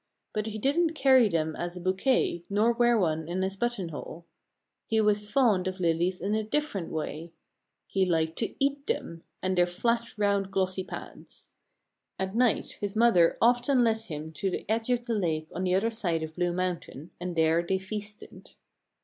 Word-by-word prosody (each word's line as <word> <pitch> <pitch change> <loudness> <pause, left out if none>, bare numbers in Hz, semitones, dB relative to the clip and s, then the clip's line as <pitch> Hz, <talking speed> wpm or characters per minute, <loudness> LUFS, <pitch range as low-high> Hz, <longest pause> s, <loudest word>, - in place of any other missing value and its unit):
But 215 0 -2
he 220 0 -4
didn't 315 +8 +1
carry 260 -6 +5
them 160 -3 -1
as 175 +1 -4
a - - -5
bouquet, 185 +1 +1
nor 215 +4 +3
wear 240 0 +3
one 160 -5 0
in 180 +2 -1
his 190 +1 -2
buttonhole. 180 -7 -4 0.6
He 225 - +2
was 210 -1 +1
fond 215 -9 +3
of 185 0 -4
lilies 175 +1 +1
in 200 +4 -1
a 215 0 +1
different 220 - -2
way: 160 +1 -5 0.5
he 195 - 0
liked 160 -2 0
to 225 - -2
eat 280 +1 0
them, 165 0 -3 0.2
and 185 0 0
their 175 -1 +4
flat, 230 +7 -1
round, 200 -2 +1
glossy 190 -1 -1
pads. - - -10 0.7
At 190 0 -3
night 245 -2 +1
his 205 0 -2
mother 215 -7 +4
often 245 +2 +4
led 225 -1 +3
him 160 -8 -7
to 190 +5 -2
the - - -4
edge 225 +2 -1
of 240 -1 +1
the 235 - -1
lake 160 -6 -1
on 185 +2 -2
the 180 0 +2
other 225 +4 +1
side 175 -8 0
of 160 0 -6
Blue 175 +1 0
Mountain 175 -4 -4
and 180 0 -4
there 160 +1 +3
they 190 +2 0
feasted. 205 +2 -8
190 Hz, 185 wpm, -28 LUFS, 175-225 Hz, 0.7 s, carry